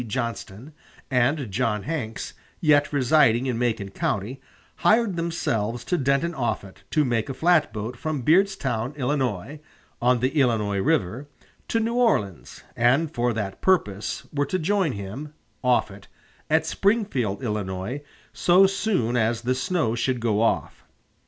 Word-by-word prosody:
Johnston, 115 +2 -5 0.4
and 130 -1 +1
John 105 +1 0
Hanks, 135 -9 -4 0.3
yet 145 -2 +3
residing 130 -3 +3
in 125 -3 -1
Macon 115 -5 -1
County, 110 +7 -2 0.4
hired 220 -3 +3
themselves 120 -10 -2
to 180 - 0
Denton 140 +3 +1
Offutt 110 -8 -3
to 150 -4 +2
take 120 +1 0
a 135 - -4
flatboat 130 -9 +1
from 150 +1 -3
Beardstown, 150 - +1
Illinois 135 -2 -2 0.4
[on 125 0 +3
the 130 +2 +1
Illinois 115 -9 +1
River], 120 - 0 0.4
to 225 - +1
New 225 +1 -1
Orleans; 200 - 0
and 140 +7 +2
for 120 0 +1
that 100 -3 -4
purpose 105 - 0
were 145 -1 0
to 185 - 0
join 185 -3 +1
him 115 +10 -7 0.3
Offutt 105 -6 0 0.4
at - - +3
Springfield, 195 - 0
Illinois, 105 +3 -3 0.3
so 180 +2 +5
soon 195 - 0
as 115 -1 +1
the 125 +2 0
snow 155 - 0
should 120 +2 -1
go 110 -2 +1
off. 115 - 0
125 Hz, 135 wpm, -24 LUFS, 110-155 Hz, 0.4 s, so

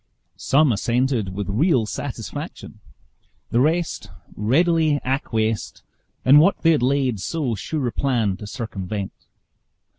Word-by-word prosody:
Some 140 0 +3
assented 115 -2 0
with 100 0 -3
real 125 - +2
satisfaction; 115 -4 -6 0.7
the 120 - +2
rest 160 +5 0 0.3
readily 155 - +2
acquiesced 115 -5 -2 0.4
in 140 +3 +8
what 175 +6 +3
they 165 - +6
had 155 - +2
laid 130 -3 +1
so 140 - -2
sure 135 +7 -3
a 120 - -1
plan 115 -8 0
to 105 - -9
circumvent. 100 -4 -5
125 Hz, 120 wpm, -22 LUFS, 110-150 Hz, 0.7 s, in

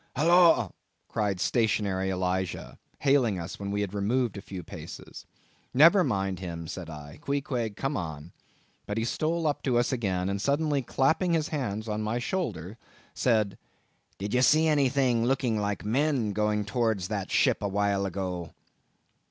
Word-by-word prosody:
"Holloa!" 165 - +5 0.4
cried 100 -4 -1
stationary 100 -4 +1
Elijah, 95 0 -2 0.2
hailing 135 -8 +3
us 85 -2 -6
when 100 0 -4
we 100 +1 -1
had 100 -1 -3
removed 110 +3 0
a 100 - -6
few 95 -2 -7
paces. - - -10 0.5
"Never 170 +8 +7
mind 95 - -1
him," 85 -3 -6
said 90 0 -6
I, 75 0 -10
"Queequeg, 130 -6 -2
come 135 +6 -2
on." 80 - -5 0.6
But 105 - -3
he 115 - 0
stole 160 +6 -1
up 150 -2 0
to 125 -3 +1
us 120 - +2
again, 95 -7 -1
and 100 0 -2
suddenly 145 +2 +1
clapping 160 +8 +1
his 160 -2 +1
hand 115 -8 -3
on 105 0 -2
my 110 +2 -1
shoulder, 115 - -3 0.3
said—"Did 105 -2 -3
ye 125 - +3
see 155 +4 +5
anything 135 -5 +2
looking 125 -4 +1
like 105 0 -2
men 125 -2 +1
going 105 0 0
towards 110 -3 0
that 100 -3 -3
ship - - +2
a 100 - 0
while 100 0 +1
ago?" 90 -3 -4
110 Hz, 155 wpm, -28 LUFS, 95-135 Hz, 0.6 s, Never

